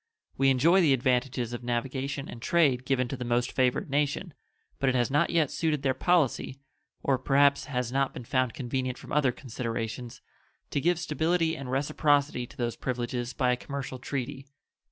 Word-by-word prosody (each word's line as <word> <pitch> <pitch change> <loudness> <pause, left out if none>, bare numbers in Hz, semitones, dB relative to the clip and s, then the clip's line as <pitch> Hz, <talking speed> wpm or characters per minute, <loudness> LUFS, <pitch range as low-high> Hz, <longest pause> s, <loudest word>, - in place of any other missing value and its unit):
We 135 0 +3
enjoy 160 +9 +5
the 150 -5 +5
advantages 125 -1 0
of 120 - -5
navigation 130 +3 -2
and 115 - -9
trade 135 -5 +2
given 130 -2 +1
to 135 - -3
the 125 - -5
most 120 0 0
favored 130 +2 +1
nation, 145 +4 0 0.5
but 135 -1 +2
it 130 - 0
has 120 0 +1
not 150 +4 +3
yet 165 -5 +2
suited 155 -3 -1
their 135 -1 +2
policy, 155 -5 +1 0.5
or 135 -2 +2
perhaps 140 +1 +3
has 125 -4 -2
not 135 0 +1
been 125 - -8
found 130 -1 0
convenient 130 0 -2
from - - -12
other 140 -3 +3
considerations, 115 -1 -5 0.5
to 140 - 0
give 175 +2 +2
stability 165 +1 0
and 140 -5 -7
reciprocity 140 -1 +1
to - - -17
those 120 -2 -1
privileges 120 -1 -3
by 125 -2 +2
a - - +2
commercial 135 0 -6
treaty. 135 +1 -4
135 Hz, 175 wpm, -28 LUFS, 125-145 Hz, 0.5 s, enjoy